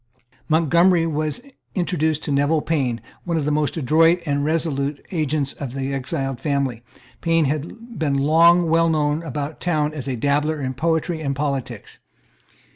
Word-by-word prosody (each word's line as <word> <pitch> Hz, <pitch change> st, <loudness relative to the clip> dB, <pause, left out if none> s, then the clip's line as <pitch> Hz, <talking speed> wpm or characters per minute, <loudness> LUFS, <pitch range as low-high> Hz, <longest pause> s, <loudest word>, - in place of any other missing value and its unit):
Montgomery 170 Hz, +2 st, +4 dB
was 155 Hz, +2 st, -2 dB, 0.3 s
introduced 160 Hz, -4 st, 0 dB
to 150 Hz, -, -3 dB
Neville 145 Hz, +3 st, +2 dB
Payne, 130 Hz, -8 st, -1 dB, 0.2 s
one 170 Hz, -2 st, -1 dB
of 150 Hz, -, -1 dB
the 150 Hz, -, 0 dB
most 150 Hz, +1 st, 0 dB
adroit 165 Hz, +4 st, +4 dB
and 145 Hz, -2 st, 0 dB
resolute 150 Hz, -2 st, -1 dB
agents 150 Hz, -4 st, 0 dB
of 135 Hz, -4 st, -6 dB
the 135 Hz, 0 st, -3 dB
exiled 135 Hz, -1 st, -3 dB
family, 140 Hz, -5 st, -1 dB, 0.4 s
Payne 165 Hz, -1 st, +2 dB
had 170 Hz, -, -5 dB
been 145 Hz, -3 st, +1 dB
long 165 Hz, +5 st, +5 dB
well 165 Hz, +1 st, +3 dB
known 150 Hz, 0 st, +1 dB
about 150 Hz, -1 st, -5 dB
town 155 Hz, -4 st, 0 dB
as 145 Hz, -3 st, -6 dB
a 130 Hz, -, -1 dB
dabbler 145 Hz, +5 st, 0 dB
in 130 Hz, -2 st, -3 dB
poetry 160 Hz, +3 st, -1 dB
and 140 Hz, -2 st, -2 dB
politics. 140 Hz, -2 st, -4 dB
150 Hz, 155 wpm, -22 LUFS, 140-165 Hz, 0.4 s, long